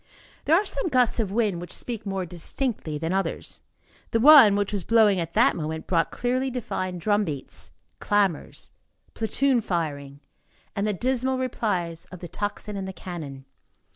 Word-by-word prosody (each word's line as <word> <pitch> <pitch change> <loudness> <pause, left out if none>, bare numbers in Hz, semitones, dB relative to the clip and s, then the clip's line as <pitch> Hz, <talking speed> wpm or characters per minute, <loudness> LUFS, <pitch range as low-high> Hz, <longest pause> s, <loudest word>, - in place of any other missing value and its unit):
There 315 - +5
are 395 +5 +3
some 280 -4 -1
gusts 250 -6 +2
of 210 -4 0
wind 205 -5 0
which 175 - -8
speak 225 -4 -4
more 195 -1 -2
distinctly 175 - -3
than 165 +4 -2
others. 195 0 -2 0.5
The 230 - +1
one 265 -6 +9
which 205 0 -1
was 200 -3 -2
blowing 215 -4 +4
at 170 -1 -4
that 240 +5 +4
moment 160 0 -4
brought 165 -2 +1
clearly 255 +2 -1
defined 185 -7 -3
drum 205 +3 +2
beats, 145 -8 -4 0.3
clamors, 200 -6 0 0.4
platoon 250 +3 +1
firing, 145 -7 -3 0.6
and 200 +1 0
the 210 - +1
dismal 260 +4 0
replies 190 -10 -2
of 185 - -11
the 175 - -8
tocsin 205 +2 -4
and 195 -1 -4
the 190 - -6
cannon. 155 -7 -8
200 Hz, 165 wpm, -25 LUFS, 170-235 Hz, 0.6 s, one